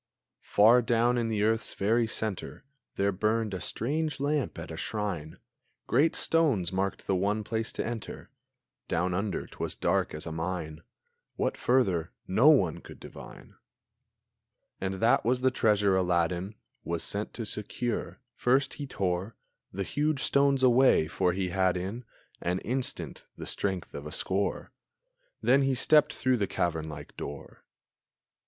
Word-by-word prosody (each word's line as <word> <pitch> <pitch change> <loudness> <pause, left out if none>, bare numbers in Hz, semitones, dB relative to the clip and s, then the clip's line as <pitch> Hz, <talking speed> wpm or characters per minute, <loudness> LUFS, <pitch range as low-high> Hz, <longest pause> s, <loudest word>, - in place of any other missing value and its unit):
Far 115 +4 +6
down 120 +1 +2
in 115 - 0
the 105 -2 0
earth's 110 0 0
very 115 +4 +2
centre 110 +1 -4 0.3
There 100 +1 +1
burned 110 +2 0
a 95 - -4
strange 150 +4 -1
lamp 145 0 -1
at - - -7
a - - -5
shrine; 95 -8 -4 0.5
Great 160 +4 +3
stones 130 - +2
marked 95 +1 -2
the 95 - +1
one 100 +3 0
place 110 +2 -2
to - - -3
enter; 115 -2 -6 0.6
Down 90 +2 0
under 95 +1 -2
t'was - - -5
dark - - 0
as 75 - -6
a 80 - -5
mine; 80 -1 -4 0.5
What - - -1
further 95 -10 +1
no 110 +11 +5
one 95 - +4
could - - -13
divine! - - -12 1.3
And 95 0 -2
that 115 +5 +3
was 125 +2 +1
the 130 0 +3
treasure 105 -5 +3
Aladdin 90 +2 0 0.3
Was 85 -1 -3
sent 105 +1 -4
to 115 - -4
secure. 110 +3 -3
First 135 +3 +2
he 140 - -4
tore 95 -1 -2 0.4
The 100 - -3
huge 145 +5 0
stones 140 -1 +3
away, 125 -9 +5
for 90 +2 +1
he 95 0 -1
had 95 0 +1
in 100 +7 -5 0.4
An 90 +1 0
instant 130 +2 -3
the - - -7
strength 95 -3 -2
of 70 +1 -6
a - - -7
score; 95 +5 -1 0.7
Then 135 +2 +5
he 135 -1 +2
stepped 150 +4 +5
through 130 -1 +1
the 100 -3 0
cavern 80 -3 -1
like 75 -1 -9
door. 70 0 -8
105 Hz, 150 wpm, -29 LUFS, 90-125 Hz, 1.3 s, Far